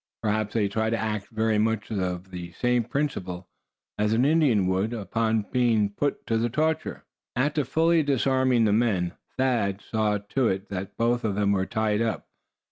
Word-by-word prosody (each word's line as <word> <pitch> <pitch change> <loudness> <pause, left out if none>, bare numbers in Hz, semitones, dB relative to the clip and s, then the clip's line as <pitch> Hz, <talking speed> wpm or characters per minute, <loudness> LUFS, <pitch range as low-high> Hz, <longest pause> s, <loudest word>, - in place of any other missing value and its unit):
Perhaps 110 0 -1
they 105 -3 +2
try 110 +2 -1
to 115 - 0
act 110 -2 -3
very 110 -1 0
much 110 0 0
on 90 -3 -2
the 90 -1 -7
same 125 +4 +1
principle 95 -11 -3 0.5
as 105 +1 +2
an 120 +4 +3
Indian 145 - +3
would, 95 +5 0
upon 110 0 -1
being 115 -5 +2
put 145 +8 -2
to 115 -1 0
the 120 +1 0
torture. 155 +5 -1 0.3
After 145 +4 +1
fully 160 +5 +3
disarming 130 -4 +2
the 105 - +3
men 100 -6 +1 0.2
Thad 115 -7 +1
saw 110 -1 0
to 110 +5 -1
it 95 0 -2
that 95 -1 -5
both 120 +1 +1
of 105 -3 -1
them 100 -1 +2
were 95 -1 +1
tied 110 -2 0
up. 115 -1 -2
110 Hz, 175 wpm, -26 LUFS, 100-125 Hz, 0.5 s, an